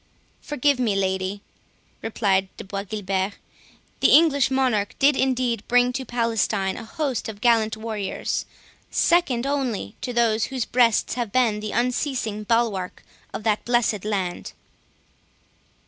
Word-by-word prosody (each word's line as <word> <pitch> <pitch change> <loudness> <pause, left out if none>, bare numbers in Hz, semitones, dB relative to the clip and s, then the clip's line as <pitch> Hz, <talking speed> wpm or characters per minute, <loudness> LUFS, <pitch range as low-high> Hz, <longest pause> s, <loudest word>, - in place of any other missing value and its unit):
"Forgive 285 -2 +1
me, 225 -5 +1
lady," 190 +1 -1 0.6
replied 195 -4 0
De - - -7
Bois 195 +1 -4
Guilbert; 195 -1 -2 0.7
"the - - +5
English 290 -5 +5
monarch 255 -6 0
did, 285 +1 +4
indeed, 255 -4 0
bring 245 0 +3
to 265 +1 -4
Palestine 225 -5 0
a - - -7
host 265 0 -3
of 205 -2 -8
gallant 220 -1 +2
warriors, 215 -3 -3 0.4
second 280 -9 +2
only 260 - -2
to 250 - -3
those 230 -2 +2
whose 260 -3 -3
breasts 240 -3 +2
have 240 -4 -3
been 230 -4 +2
the 210 0 -5
unceasing 245 -3 -1
bulwark 215 -5 -1 0.3
of - - -6
that 215 -1 +1
blessed 235 -4 +1
land." 195 -4 -3
230 Hz, 130 wpm, -23 LUFS, 205-250 Hz, 0.7 s, the